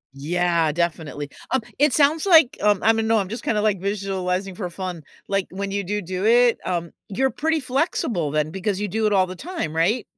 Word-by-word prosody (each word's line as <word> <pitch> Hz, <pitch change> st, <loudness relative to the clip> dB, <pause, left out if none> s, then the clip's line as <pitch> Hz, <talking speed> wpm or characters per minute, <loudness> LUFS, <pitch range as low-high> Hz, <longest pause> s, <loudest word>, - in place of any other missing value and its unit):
Yeah, 170 Hz, +2 st, +1 dB
definitely, 155 Hz, -3 st, -3 dB, 0.2 s
um, 260 Hz, -, +2 dB, 0.2 s
it 295 Hz, 0 st, +4 dB
sounds 300 Hz, +6 st, +3 dB
like, 325 Hz, -8 st, +6 dB
um, 205 Hz, -2 st, +3 dB
I 225 Hz, -, +5 dB
don't 225 Hz, 0 st, -1 dB
know 225 Hz, 0 st, +3 dB
I'm 195 Hz, -2 st, -1 dB
just 230 Hz, -, -6 dB
kinda, 210 Hz, -2 st, 0 dB
like, 210 Hz, -4 st, +1 dB
visualizing 195 Hz, -1 st, -2 dB
for 180 Hz, -1 st, -5 dB
fun. 175 Hz, -2 st, -6 dB, 0.2 s
Like, 195 Hz, -1 st, 0 dB
when 195 Hz, +2 st, -5 dB
you 200 Hz, 0 st, -1 dB
do 205 Hz, +3 st, -2 dB
do 185 Hz, +2 st, -4 dB
it, 240 Hz, +1 st, +4 dB
um 170 Hz, -2 st, -2 dB, 0.2 s
you're 265 Hz, +7 st, +1 dB
pretty 320 Hz, +3 st, 0 dB
flexible 250 Hz, -, -1 dB
then 155 Hz, 0 st, 0 dB
because 195 Hz, +3 st, -2 dB
you 210 Hz, -, -1 dB
do 220 Hz, +3 st, -1 dB
it 210 Hz, -, +2 dB
all 190 Hz, -2 st, +3 dB
the 185 Hz, -, -7 dB
time, 285 Hz, -, -5 dB
right? 195 Hz, +8 st, +1 dB
195 Hz, 210 wpm, -23 LUFS, 175-225 Hz, 0.2 s, like